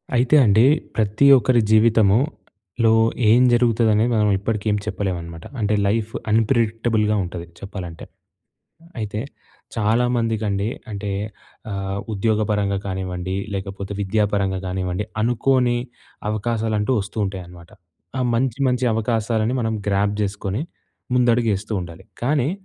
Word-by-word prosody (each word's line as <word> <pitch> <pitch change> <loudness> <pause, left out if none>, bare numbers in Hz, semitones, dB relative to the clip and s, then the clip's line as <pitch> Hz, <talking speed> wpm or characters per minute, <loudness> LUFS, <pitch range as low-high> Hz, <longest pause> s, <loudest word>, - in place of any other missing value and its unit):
అయితే 125 +4 +3
అండి 110 +3 +5 0.3
ప్రతి 105 +4 +2
ఒక్కరి 120 0 +3
జీవితములో 110 - +2 0.4
ఏం 120 +3 +6
జరుగుతది? 120 -1 +3
అనేది 110 +3 +2
మనం 105 -1 +3
ఇప్పటికి 105 +1 -3
ఏం 105 - +1
చెప్పలేము 95 -4 -2
అనమాట. 85 -1 -10
అంటే 105 -1 +1
లైఫ్ 110 +2 0 0.2
అన్ప్రెడిక్టబుల్‌గా 110 -1 +2
ఉంటది 85 -1 -6
చెప్పాలంటే. 90 -4 -7 0.8
హ్మ్. 165 - -19
అయితే 105 -1 -3 0.6
చాలామందికి 115 0 +1
అండి. 100 +2 -1 0.2
అంటే, 100 0 -4 0.6
అహ్, 95 0 -3
ఉద్యోగపరంగా 105 -1 0
కానివ్వండి, 95 -1 -3 0.2
లేకపోతే 95 0 -5
విద్యాపరంగా 100 -1 0
కానివ్వండి, 90 +2 -2 0.2
అనుకోని 120 +1 +2 0.5
అవకాశాలంటూ 110 +1 -1
వస్తూ 100 +3 -9
ఉంటాయి 95 -1 -5
అనమాట. 85 -1 -14 0.5
ఆ - - +1
మంచి, 125 0 0
మంచి 125 0 0
అవకాశాలను 110 0 0
మనం 110 0 -1
గ్రాబ్ 100 +1 +1
చేసుకొని, 100 +3 -2 0.5
ముందడుగు 120 -2 +3
ఏస్తూ 105 +3 -6
ఉండాలి. 85 +1 -10 0.2
కానీ 140 +1 +1
105 Hz, 120 wpm, -21 LUFS, 100-115 Hz, 0.8 s, ఏం